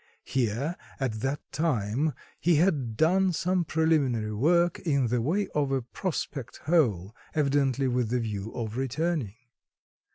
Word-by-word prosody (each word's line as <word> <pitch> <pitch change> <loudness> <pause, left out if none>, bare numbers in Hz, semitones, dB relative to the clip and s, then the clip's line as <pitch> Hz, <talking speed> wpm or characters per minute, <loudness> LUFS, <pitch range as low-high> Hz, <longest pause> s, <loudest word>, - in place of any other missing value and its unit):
Here, 130 +6 -1 0.2
at 125 -5 -2
that 135 +5 -2
time, 145 -1 0 0.2
he 170 +1 +3
had 145 - +1
done 185 +5 +3
some 180 +2 +1
preliminary 145 -10 +1
work 170 +9 +3
in 140 -8 +1
the 120 0 +1
way 180 - 0
of 145 -2 +1
a 135 -2 0
prospect 135 -2 -4
hole, 115 - +2 0.2
evidently 140 -2 +2
with 125 -3 0
the 125 +1 +1
view 110 -2 -4
of 115 -1 -4
returning. 135 - -1
135 Hz, 135 wpm, -28 LUFS, 115-160 Hz, 0.2 s, he